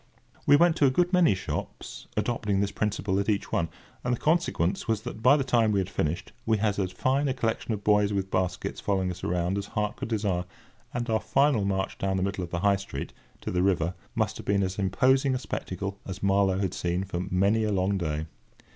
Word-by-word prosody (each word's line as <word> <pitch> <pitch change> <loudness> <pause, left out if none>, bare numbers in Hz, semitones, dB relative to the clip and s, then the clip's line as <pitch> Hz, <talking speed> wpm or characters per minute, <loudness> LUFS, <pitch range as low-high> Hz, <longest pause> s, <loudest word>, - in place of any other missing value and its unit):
We - - +8
went 170 +2 +5
to 140 - +5
a - - +5
good 175 +7 +1
many 175 - +5
shops, 90 - -6
adopting 105 -5 0
this 100 0 0
principle 100 -2 -1
at 100 - -1
each 100 -2 0
one; 85 -1 0 0.3
and 125 0 +1
the - - -13
consequence 150 - +1
was 110 -2 0
that, 110 - -6
by 130 +5 +6
the 140 - 0
time 120 -4 +3
we 100 - +2
had 95 0 -2
finished, 85 +4 -2
we 110 -1 +2
had 105 -1 0
as 95 -2 -1
fine 135 +8 +1
a 130 - 0
collection 115 +1 -1
of 105 -2 -3
boys 105 0 +3
with 95 -1 -2
baskets 95 -1 -1
following 95 -2 0
us 90 - -9
around 90 +2 0
as 100 - -6
heart 105 0 -2
could - - -4
desire; 100 -6 -1 0.5
and 120 0 -3
our 110 -1 +2
final 135 -6 +2
march 95 -1 -1
down 95 -1 0
the 95 - 0
middle 100 -1 -2
of 85 - -6
the 85 0 -3
High 100 0 +4
Street, 95 -8 -6 0.3
to - - -4
the 90 - +1
river, 90 -2 +1 0.2
must - - 0
have - - -9
been 100 0 +2
as 95 +1 -3
imposing 130 +7 +3
a - - +1
spectacle 100 -5 -5
as 95 0 -7
Marlow 100 -1 +3
had 95 -2 -1
seen 90 +1 -1
for 90 -2 -4
many 100 +5 +2
a 105 - 0
long 95 0 +1
day. 80 -2 -2
100 Hz, 225 wpm, -27 LUFS, 95-115 Hz, 0.5 s, We